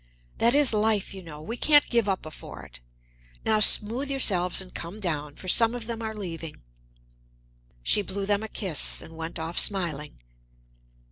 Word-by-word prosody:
That 235 +3 +3
is 285 -5 +4
life, 215 -2 0
you 190 - -9
know 155 -3 -11
we 225 +9 -6
can't 290 +1 +4
give 235 -4 0
up 190 - -2
before 155 - -10
it. - - -15 0.7
Now 215 -1 +2
smooth 230 +6 +5
yourselves 185 -10 +3
and 185 -1 -7
come 175 +5 -8
down, 150 -6 -4
for 185 - -11
some 230 +5 +4
of 240 -2 -6
them 230 0 -6
are 220 -1 -5
leaving." 165 - -8 1.2
She 205 - +3
blew 195 0 -5
them 205 0 0
a 220 - -5
kiss 190 -7 0
and 165 - -13
went 160 +1 -6
off 165 +1 -1
smiling. 165 -7 0
200 Hz, 175 wpm, -25 LUFS, 165-225 Hz, 1.2 s, smooth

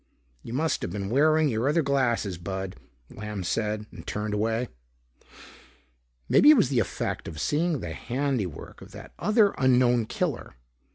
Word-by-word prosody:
"You - - -9
must 155 +5 0
have - - -3
been 100 +2 -4
wearing 155 +4 +4
your 120 +1 0
other 160 +2 +2
glasses, 120 -9 0
Bud," 95 +1 -5 0.4
Lamb 105 -2 -6
said 105 +3 -2
and - - -12
turned 105 0 -3
away. 110 +3 0 1.6
Maybe 295 - +6
it 305 - +8
was 210 - +3
the 130 -4 +1
effect 110 - -3
of 80 -2 -7
seeing 155 - 0
the 85 -2 -5
handiwork 125 - -3
of - - -13
that - - -11
other 210 -1 +3
unknown 125 -3 +3
killer. - - -3
120 Hz, 155 wpm, -26 LUFS, 105-145 Hz, 1.6 s, it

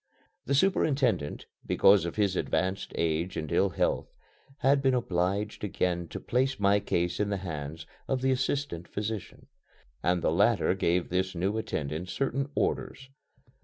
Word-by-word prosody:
The 140 - +2
superintendent, 135 - +1 0.2
because 100 -2 +5
of 85 - -4
his 100 -3 +1
advanced 95 +1 -1
age 85 +2 -1
and 80 -2 -4
ill 100 - +3
health, - - 0 0.5
had 140 +1 +4
been 135 -1 +3
obliged 100 -1 -1
again 90 -3 -1
to - - -6
place 130 +1 0
my 100 0 +4
case 90 -2 -1
in 105 0 +1
the 100 - 0
hands 80 0 -5 0.2
of 130 -1 -1
the 135 - +3
assistant 130 -9 -1
physician, 105 -1 -5 0.6
and 90 -1 +1
the - - +3
latter 100 +4 +3
gave 90 -2 0
this 95 +1 -1
new 95 +5 0
attendant 80 -4 -3
certain 135 +3 -1
orders. 130 0 -2
100 Hz, 150 wpm, -29 LUFS, 85-125 Hz, 0.6 s, because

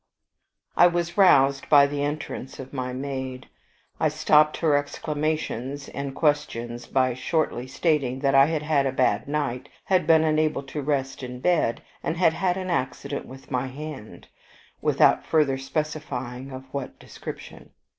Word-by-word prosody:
I 175 - +7
was 175 -1 -1
roused 140 -8 +4
by 145 -1 +7
the 140 0 -3
entrance 145 -2 -4
of 130 +1 -9
my 125 -2 -3
maid. 130 -1 -5 0.5
I - - +3
stopped 150 0 +3
her 155 -3 +2
exclamations 145 -2 -2
and 140 -1 -5
questions 120 -6 -1
by 130 -1 +2
shortly 130 -1 -1
stating 135 -3 0
that 135 -1 +2
I 135 +1 +7
had 155 -2 -1
had 145 -3 +2
a - - 0
bad 125 -5 +1
night, 140 -3 -2
had 185 -4 +1
been 160 -1 +6
unable 155 -2 +1
to 140 +2 -5
rest 135 -2 -2
in 125 -1 -7
bed, 155 -6 +1 0.2
and 165 - -2
had 165 -2 +4
had 185 0 0
an 185 -1 -3
accident 140 -1 -3
with 135 +1 -13
my 130 0 -1
hand, 140 -3 -9 0.5
without - - +4
further 145 -4 +2
specifying 135 -3 -4
of 130 0 -7
what 140 -2 -5
description. - - -10
140 Hz, 155 wpm, -25 LUFS, 130-155 Hz, 0.5 s, I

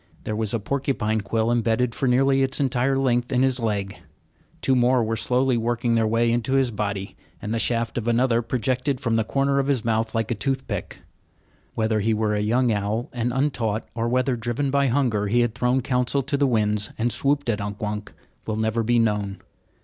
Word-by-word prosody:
There 110 - -3
was 110 -1 -1
a 115 - 0
porcupine 110 -3 -1
quill 110 +3 0
imbedded 120 +1 +1
for 135 - -1
nearly 135 +2 +3
its 135 0 0
entire 135 0 +1
length 125 -1 +1
in 130 0 +2
his 130 -1 +2
leg. 105 -4 -2 0.7
Two 135 - +3
more 125 0 +3
were 115 +1 -1
slowly 125 +3 +1
working 120 +1 0
their 115 -1 +2
way 115 +1 +2
into 120 +3 0
his 135 -3 +2
body; 100 -2 -3 0.2
and 105 - -4
the 115 - 0
shaft 115 0 0
of 115 - -6
another 120 0 +2
projected 130 +3 -1
from 120 -4 -1
the 115 0 +2
corner 140 +4 +1
of 135 - 0
his 130 -5 0
mouth 110 0 0
like 115 0 -1
a - - +3
toothpick. 135 +4 -3 0.7
Whether 110 -1 +1
he 110 +2 +1
were 105 0 0
a 105 - 0
young 120 +3 +2
owl 105 +3 -1
and 120 0 -1
untaught, 120 -5 -1
or 115 0 -1
whether, 130 +1 +1
driven 120 +4 -2
by 140 0 +2
hunger, 120 -6 +1
he 120 +4 +2
had 120 -2 0
thrown 125 +2 +1
counsel 125 +2 0
to 140 +3 -1
the 140 0 +2
winds 105 -3 0
and 120 +2 0
swooped 140 +2 0
at 110 -3 0
Unk 100 0 -5
Wunk, 105 0 -4 0.4
will 110 - -1
never 110 +1 0
be 120 +2 +2
known. 105 -3 0
120 Hz, 205 wpm, -24 LUFS, 110-130 Hz, 0.7 s, nearly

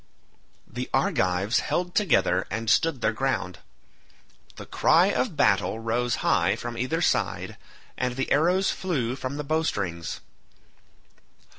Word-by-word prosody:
The - - -6
Argives 95 +5 +1
held 180 0 -2
together 115 - +2
and 110 +1 -1
stood 160 -6 +2
their 110 - +2
ground. 110 -7 -2 1.0
The - - -9
cry - - +3
of - - -1
battle 110 - +2
rose 120 +2 -1
high - - +3
from 120 0 -6
either 130 +8 -1
side, - - 0 0.4
and 125 -1 -1
the 135 - -3
arrows 180 +6 +3
flew 130 -10 -2
from 135 +1 -5
the 150 - -3
bowstrings. 105 - -2
125 Hz, 125 wpm, -25 LUFS, 110-160 Hz, 1.0 s, cry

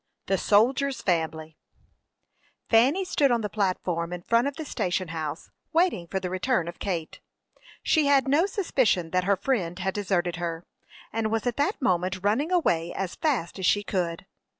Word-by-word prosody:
THE 195 -1 0
SOLDIER'S 260 +6 +2
FAMILY. 160 -3 -1 1.1
Fanny 265 +12 +4
stood 290 -6 +2
on 240 -2 +2
the 210 - -3
platform 180 -4 -1
in 175 -1 -6
front 230 +6 +2
of 280 - -4
the 315 - -6
station 185 - -2
house, 155 -1 -5 0.2
waiting 330 - +2
for 190 - -2
the 180 -1 -4
return 185 -1 0
of 170 - -7
Kate. 170 -5 -4 0.6
She 310 -3 +3
had 275 -2 +4
no 305 +7 +3
suspicion 260 - +1
that 185 0 +1
her 200 +1 +3
friend 180 -7 -1
had 190 0 -2
deserted 180 -4 -1
her, 170 -1 -4 0.5
and 225 0 0
was 225 -1 -1
at 245 -2 -1
that 295 +9 0
moment 185 -1 0
running 245 - +1
away 175 - +1
as 190 -3 -3
fast 240 - -1
as 185 - +1
she 205 - +3
could. 180 -3 -2
195 Hz, 175 wpm, -26 LUFS, 175-265 Hz, 1.1 s, Fanny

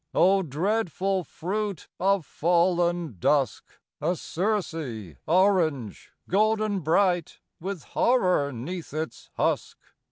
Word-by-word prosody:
O 195 +2 +5
dreadful 190 +3 0
fruit 200 +3 -4
of 195 -2 +2
fallen 175 - +1
dusk! 140 - +1 0.4
A 180 - +1
Circe 160 - -3
orange, 165 - +2 0.2
golden 215 +1 +2
bright, 175 +1 +1 0.2
With 185 -2 -5
horror 180 - +2
'neath 155 +6 -6
its 155 0 -5
husk. - - 0
175 Hz, 95 wpm, -26 LUFS, 155-195 Hz, 0.4 s, O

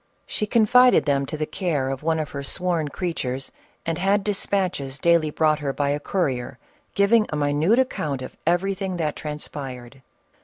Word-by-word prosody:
She 210 - -3
confided 245 +3 +5
them 140 -2 +1
to 155 - -4
the 155 - -1
care 150 -7 -1
of 135 - -4
one 160 +1 +1
of 155 -2 -3
her 140 - -4
sworn 170 +2 -1
creatures, 135 -5 -3 0.3
and 165 0 -2
had 195 +2 +2
despatches 185 -9 -1
daily 170 0 +3
brought 155 0 +2
her 145 -2 -2
by 140 0 0
a 145 +1 0
courier, 135 -8 -2 0.4
giving 210 +2 +4
a - - -3
minute 150 +8 +2
account 150 - -1
of - - -9
everything 190 +1 0
that 155 -3 -1
transpired. 135 -4 -7
155 Hz, 165 wpm, -24 LUFS, 140-190 Hz, 0.4 s, confided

